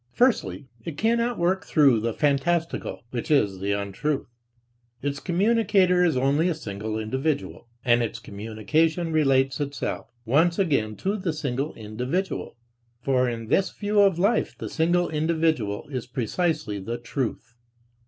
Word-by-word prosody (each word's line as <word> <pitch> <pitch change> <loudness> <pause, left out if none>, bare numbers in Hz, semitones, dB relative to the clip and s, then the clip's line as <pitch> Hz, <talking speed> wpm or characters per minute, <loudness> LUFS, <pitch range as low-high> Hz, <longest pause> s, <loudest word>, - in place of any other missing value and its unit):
Firstly, 240 - +1 0.2
it 150 +1 -6
cannot 235 +3 +1
work 180 +2 +1
through 140 -7 +4
the 115 +2 -1
fantastical, 150 +6 0
which 120 -2 -4
is 105 -11 +2
the 100 +1 0
untruth; 100 +9 -2 0.8
its 140 0 -2
communicator 190 -1 +3
is 165 -7 +2
only 140 +6 +2
a 170 - 0
single 110 -5 -5
individual. 130 +6 -2 0.2
And 120 -1 +4
its 115 - -2
communication 155 - -1
relates 135 -3 +2
itself 140 -3 -3 0.2
once 160 +8 +3
again 140 - +1
to 200 +2 +1
the 185 -5 -2
single 140 0 -3
individual; 125 - -3 0.5
for 130 -2 +2
in 115 -1 -4
this 195 - +3
view 210 0 -1
of 195 -4 +4
life 200 +6 +1
the - - -5
single 175 +2 +2
individual 155 -8 0
is 130 -4 -4
precisely 155 - -1
the 115 +5 -4
truth. 120 0 -4
145 Hz, 140 wpm, -25 LUFS, 120-175 Hz, 0.8 s, through